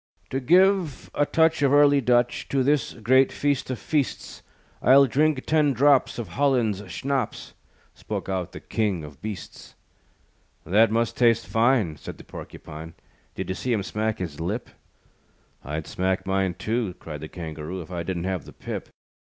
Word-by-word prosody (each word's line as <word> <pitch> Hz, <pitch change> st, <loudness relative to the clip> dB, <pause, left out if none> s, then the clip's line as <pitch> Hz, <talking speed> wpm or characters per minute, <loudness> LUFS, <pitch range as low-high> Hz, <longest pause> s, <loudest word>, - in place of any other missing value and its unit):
"To 135 Hz, -, 0 dB
give 180 Hz, +1 st, +3 dB
a 145 Hz, -, +1 dB
touch 160 Hz, -2 st, +3 dB
Of 140 Hz, -2 st, +3 dB
early 145 Hz, -1 st, +5 dB
Dutch 120 Hz, 0 st, +1 dB
To 135 Hz, -1 st, +1 dB
this 140 Hz, -2 st, +1 dB
great 130 Hz, +4 st, +3 dB
feast 145 Hz, -3 st, -1 dB
of 130 Hz, -, -2 dB
feasts, 145 Hz, 0 st, -2 dB, 0.4 s
I'll 135 Hz, +2 st, +7 dB
drink 145 Hz, +2 st, +1 dB
ten 150 Hz, -3 st, +3 dB
drops 140 Hz, +2 st, +3 dB
Of 120 Hz, -, -5 dB
Holland's 125 Hz, -8 st, +1 dB
schnapps," 135 Hz, -4 st, -3 dB, 0.4 s
Spoke -, -, -5 dB
out 95 Hz, -3 st, -2 dB
the -, -, -8 dB
King 100 Hz, -7 st, -1 dB
of 75 Hz, -2 st, -11 dB
Beasts. 105 Hz, -3 st, -8 dB, 0.9 s
"That 105 Hz, +7 st, +4 dB
must 115 Hz, +1 st, 0 dB
taste 115 Hz, -2 st, +3 dB
fine," 115 Hz, -, +2 dB
Said -, -, -9 dB
the -, -, -12 dB
Porcupine, 80 Hz, +2 st, -10 dB, 0.4 s
"Did -, -, -5 dB
you -, -, 0 dB
see 125 Hz, +5 st, -2 dB
him 105 Hz, -3 st, 0 dB
smack 110 Hz, +2 st, -2 dB
his 80 Hz, -6 st, -5 dB
lip?" 100 Hz, +9 st, -3 dB, 0.9 s
"I'd 75 Hz, +2 st, -4 dB
smack 95 Hz, +1 st, -1 dB
mine, 95 Hz, -2 st, 0 dB
too," 110 Hz, -4 st, -2 dB
Cried 75 Hz, -3 st, -8 dB
the 80 Hz, -, -7 dB
Kangaroo, 80 Hz, +1 st, -6 dB
"If 80 Hz, -, -15 dB
I 85 Hz, -1 st, -3 dB
didn't 85 Hz, 0 st, -3 dB
have 95 Hz, -2 st, -2 dB
the -, -, -12 dB
pip." -, -, -6 dB
115 Hz, 165 wpm, -25 LUFS, 95-135 Hz, 0.9 s, I'll